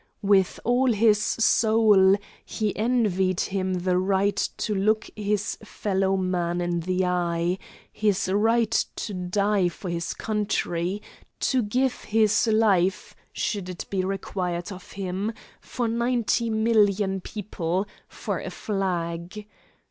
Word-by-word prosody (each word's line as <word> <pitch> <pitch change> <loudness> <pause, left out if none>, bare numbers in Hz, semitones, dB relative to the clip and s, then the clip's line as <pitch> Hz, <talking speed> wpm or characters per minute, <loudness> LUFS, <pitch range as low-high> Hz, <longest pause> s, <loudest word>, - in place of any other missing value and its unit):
With 195 -2 +3
all 245 +1 +3
his 210 -1 +4
soul 215 -3 +4 0.3
he 215 -3 -2
envied 205 -6 +1
him 190 -1 -1
the 180 0 +1
right 195 +1 +1 0.2
to 215 - -1
look 215 +2 +1
his 210 0 -2
fellow 195 -2 0
man 175 -2 -1
in 175 -1 -1
the 185 +2 0
eye, 175 0 0 0.3
his 205 -3 +1
right 225 +3 +2 0.2
to 210 - -5
die 190 +1 +1
for 175 +1 -7
his 170 0 -3
country, 205 -3 -2 0.4
to 260 -2 +2
give 250 +4 -1
his 220 +1 +3
life, 200 -4 +2 0.2
should 200 -4 -3
it 180 - -6
be 190 -2 0
required 185 -2 -3
of 185 -1 -10
him, 195 +3 -3 0.3
for 245 -2 -3
ninety 235 0 0
million 210 -3 +2
people, 190 -2 -3 0.2
for - - -4
a - - -5
flag. 180 -1 -3
200 Hz, 125 wpm, -25 LUFS, 185-215 Hz, 0.4 s, his